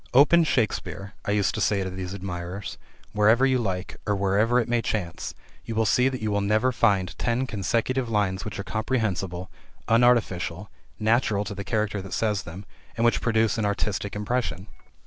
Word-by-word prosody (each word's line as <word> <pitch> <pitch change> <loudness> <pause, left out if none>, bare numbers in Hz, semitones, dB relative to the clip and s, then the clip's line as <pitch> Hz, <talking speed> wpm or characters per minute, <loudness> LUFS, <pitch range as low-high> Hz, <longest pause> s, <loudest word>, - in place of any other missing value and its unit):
"Open 160 +5 +7
Shakespeare," 110 -7 -1
I - - -3
used 105 -1 +2
to 110 - -3
say 100 -1 +2
to 95 - -3
these 95 0 -5
admirers, 90 0 -6 0.3
"wherever 110 +5 +4
you 130 -1 +2
like, 95 -5 -3
or 105 - +2
wherever 100 +5 +2
it 115 - -1
may 120 -1 +1
chance, 95 -7 -3 0.3
you 115 - -5
will 110 0 +2
see 125 +5 +3
that 130 -4 -5
you 110 - 0
will 100 0 +1
never 110 +5 +2
find 100 -7 +1
ten 120 +2 0
consecutive 115 +4 -1
lines 100 -4 0
which 105 -4 -6
are 100 - -4
comprehensible, 100 -6 -2 0.4
unartificial, 105 -5 +2 0.3
natural 110 -2 +2
to 100 - -5
the 100 - -5
character 105 -3 -1
that 95 -1 -8
says 105 -3 0
them, 90 +4 -9 0.3
and 115 - +2
which 115 - +3
produce 115 -1 +2
an 110 - +1
artistic 100 0 -2
impression." 105 -2 -2
105 Hz, 180 wpm, -25 LUFS, 95-115 Hz, 0.4 s, Open